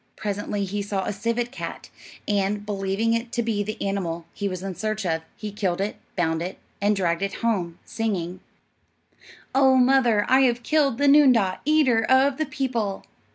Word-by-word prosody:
Presently 205 0 -3
he 205 +2 -3
saw 200 -1 -2
a - - -2
civet 230 +4 -2
cat, 270 - -7 0.4
and, 205 0 0
believing 200 +2 0
it 230 +1 -2
to 235 -1 0
be 220 -3 -1
the 215 +1 -4
animal 175 -4 -2
he 205 - -3
was 185 -1 -5
in 195 -1 -4
search 215 +1 -3
of, 160 -2 0
he 210 -1 -6
killed 190 -4 -1
it, 200 +2 -2 0.2
bound 165 -2 0
it, 180 +2 -5 0.2
and 205 +1 +3
dragged 170 -2 0
it 195 0 -1
home, 180 -7 0
singing, 185 -5 -3 1.1
"Oh, 265 -1 +5
mother, 250 -4 +4
I 260 +1 +5
have 245 -2 +2
killed 285 -4 +2
The 285 +1 +2
noondah, 255 -10 +5
eater 285 -7 +3
of 265 +3 +3
the 310 - -1
people." 250 -9 -2
210 Hz, 175 wpm, -24 LUFS, 195-245 Hz, 1.1 s, Oh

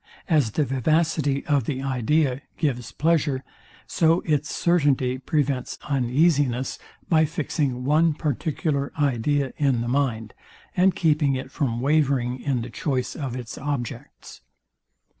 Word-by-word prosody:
As 150 - +3
the 150 - +1
vivacity 145 +1 +1
of 140 -5 +1
the 135 0 -3
idea 135 +1 +1 0.2
gives 125 -8 -2
pleasure, 150 -4 +1 0.4
so 165 +1 +2
its 150 -2 -1
certainty 140 -7 +1
prevents 140 -2 -1
uneasiness, 135 -1 +1 0.3
by 160 -2 +4
fixing 145 -4 -2
one 155 +3 +3
particular 145 0 -1
idea 140 0 +1
in 135 -5 +2
the 120 - -3
mind, 120 -5 -1 0.4
and 185 +1 +3
keeping 150 -4 +2
it 130 +1 -6
from 120 -6 -1
wavering 135 -3 +1
in 130 -5 -1
the 120 - -8
choice 130 -3 -2
of 135 -6 -4
its 125 -3 -7
objects. 140 -5 -6
140 Hz, 125 wpm, -24 LUFS, 125-155 Hz, 0.4 s, by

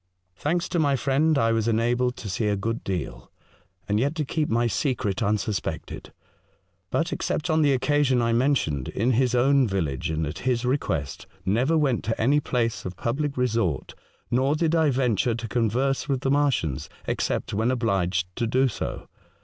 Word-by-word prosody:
Thanks 170 - -1
to 175 - 0
my 145 -3 +3
friend, 140 +4 +2
I 115 -3 +3
was 115 -1 +1
enabled 120 +2 +1
to 110 - -7
see 105 +3 -1
a 105 - +2
good 115 +4 -3
deal, 90 -7 -5 0.6
and 105 +1 +1
yet 140 +6 0
to 155 -3 -1
keep 155 +2 -1
my 120 +1 +2
secret 115 -5 -1
unsus 105 -1 0
pected; - - -6 0.8
but, - - 0
except 160 +2 -2
on 160 0 +3
the 145 -2 +4
occasion 135 0 +2
I 115 -1 +1
men 135 +5 +3
tioned, 70 - -2
in 115 +5 0
his 125 0 +2
own 135 +1 +4
village 80 - -2
and 80 0 -1
at 75 +2 -5
his 125 -1 0
request, 80 - -2 0.2
never 125 +12 +2
went 135 -7 +1
to 115 - -2
any 140 +6 +3
place 120 -5 -1
of 90 0 -6
public 140 +4 -2
resort, 115 - 0 0.4
nor 130 +4 +2
did 160 0 +1
I 160 -2 +3
venture 125 -3 +1
to 115 0 -5
converse 125 +6 0
with 135 -2 0
the 135 - 0
Martians, 140 - 0 0.2
except - - -2
when 110 +4 +1
obliged 95 -7 0
to 120 - 0
do 130 +3 +3
so. - - -5
120 Hz, 180 wpm, -25 LUFS, 105-140 Hz, 0.8 s, the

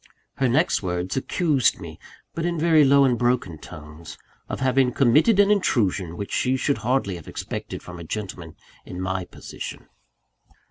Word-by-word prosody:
Her 130 -2 +2
next 155 +9 +2
words 90 -1 -3
accused 140 -1 +1
me 85 -4 -9 0.3
but 165 - -3
in 170 0 -1
very 160 -1 +4
low 140 0 +5
and 125 -3 +1
broken 120 -10 0
tones 80 -1 -11 0.3
of - - -4
having 130 -1 +2
committed 150 - +4
an 205 0 +5
intrusion 100 - +1
which 100 - -5
she 130 +1 +1
should 140 +2 0
hardly 120 -6 0
have 85 - -13
expected - - -6
from 90 -1 -9
a - - -7
gentleman 90 -3 -6 0.3
in 90 - -8
my 95 0 -2
position. - - -9
120 Hz, 165 wpm, -24 LUFS, 90-140 Hz, 0.3 s, low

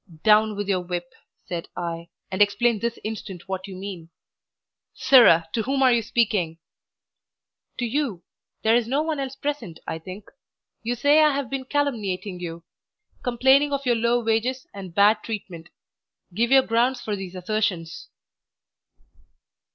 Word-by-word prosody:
"Down 215 0 +4
with 205 0 -4
your 190 -2 +1
whip!" 175 -1 -5 0.3
said 170 -2 -5
I, 170 -1 -5 0.2
"and 190 +2 -1
explain 205 +2 +3
this 235 +1 -2
instant 205 -5 -6
what 190 0 -4
you 190 - -8
mean." 185 -4 -7 0.9
"Sirrah! 170 -11 +6
to 225 - 0
whom 270 +3 0
are 255 -1 +6
you 235 - +2
speaking?" 205 -7 0 1.2
"To 245 - -1
you. 235 - -2 0.4
There 220 +1 +4
is 240 -2 +1
no 275 +5 +1
one 315 -2 -2
else 270 -1 -4
present, 280 - -4
I 160 - -4
think. 185 +5 -10 0.5
You 235 +2 -2
say 285 +5 +4
I 300 -2 +4
have 275 -3 -3
been 270 -1 -3
calumniating 215 -10 -2
you 170 -1 -7 0.6
complaining 265 +4 +3
of 280 -1 -2
your 245 - +3
low 235 +1 +1
wages 230 +4 0
and 190 -4 -9
bad 205 +2 +5
treatment. 185 -7 -7 0.6
Give 230 +5 +1
your 265 0 +6
grounds 240 +3 +1
for 210 - -3
these 190 -2 -7
assertions." 185 -3 -2
220 Hz, 150 wpm, -24 LUFS, 185-255 Hz, 1.2 s, Sirrah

